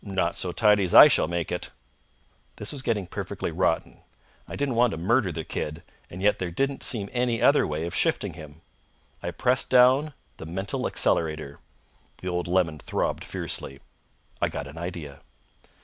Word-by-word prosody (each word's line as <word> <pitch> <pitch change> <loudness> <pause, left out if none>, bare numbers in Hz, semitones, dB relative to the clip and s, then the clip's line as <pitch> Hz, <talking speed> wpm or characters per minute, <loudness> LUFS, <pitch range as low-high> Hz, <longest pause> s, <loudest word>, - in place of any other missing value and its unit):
"Not 95 -4 -1
so 90 - -1
tidy 105 +3 +3
as 90 - +1
I - - +12
shall - - +2
make 85 -1 -3
it." - - -3 0.9
This 105 - -4
was 145 - -4
getting 110 -6 -1
perfectly 90 - -5
rotten. - - -1 0.5
I - - -7
didn't 140 -2 -1
want 120 +1 +3
to 95 - -5
murder 100 +3 +1
the 80 -1 -5
kid, 75 +3 -5 0.3
and 90 +2 -8
yet 105 - +3
there 90 - -2
didn't 135 +10 -1
seem 105 -5 +1
any 120 -2 0
other - - +4
way 75 +2 -3
of 85 - -5
shifting - - 0
him. 80 -1 -12 0.6
I 85 - -3
pressed 125 +9 +1
down 130 +4 +4 0.2
the 80 - -9
mental 95 +4 -2
accelerator. 75 -3 0 0.6
The 90 - -5
old 90 -1 -2
lemon 85 -4 +1
throbbed - - -2
fiercely. 70 0 -4 0.6
I - - +2
got 70 - -5
an 75 +4 -10
idea. 85 -5 -7
90 Hz, 175 wpm, -26 LUFS, 80-115 Hz, 0.9 s, I